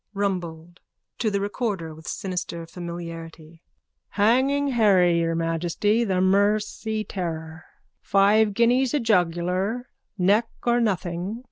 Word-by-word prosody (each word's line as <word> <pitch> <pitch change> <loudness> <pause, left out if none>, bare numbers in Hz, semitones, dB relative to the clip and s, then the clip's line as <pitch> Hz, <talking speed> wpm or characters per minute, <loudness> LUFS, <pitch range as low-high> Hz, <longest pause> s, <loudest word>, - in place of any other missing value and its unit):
_ - - -61
RUMBOLD: 175 -4 -3 0.4
(To 225 - +1
the 200 -1 -1
recorder 200 -5 -3
with 160 +1 -13
sinister 180 -4 -4
familiarity.) 165 -1 -8 0.5
Hanging 265 +7 +2
Harry, 190 -8 +4
your 165 0 0
Majesty, 170 +7 0
the 190 -5 0
Mersey 210 +3 +1
terror. 160 -5 -5 0.4
Five 205 +1 +3
guineas 245 +4 +3
a - - +2
jugular. 185 +2 0 0.3
Neck 205 +5 +3
or 240 0 +2
nothing. 185 0 -2
190 Hz, 115 wpm, -24 LUFS, 170-220 Hz, 0.5 s, Harry